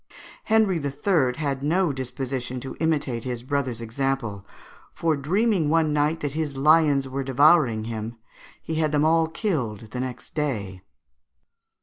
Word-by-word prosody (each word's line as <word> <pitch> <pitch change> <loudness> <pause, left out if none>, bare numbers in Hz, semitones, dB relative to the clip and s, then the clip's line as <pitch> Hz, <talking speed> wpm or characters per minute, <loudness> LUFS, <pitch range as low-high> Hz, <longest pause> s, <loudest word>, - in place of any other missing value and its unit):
Henry 215 -5 +3
III. 140 -2 +1
had 140 -3 -2
no 165 +2 +1
disposition 130 -1 -4
to 135 - -7
imitate 145 -8 0
his 125 -2 -4
brother's 130 -3 -2
example; 115 -3 -2 0.5
for 165 -2 0
dreaming 180 +3 +1
one 160 -1 +2
night 150 +2 +1
that 145 - -2
his 150 -2 -3
lions 145 -1 +4
were 135 +1 -3
devouring 135 -3 +4
him, 115 +1 -5 0.5
he 160 - -4
had 155 -1 +1
them 150 0 +2
all 165 0 +3
killed 125 - -3
the 125 - -4
next 130 -1 -6
day. 105 - -3
140 Hz, 140 wpm, -24 LUFS, 125-160 Hz, 0.5 s, lions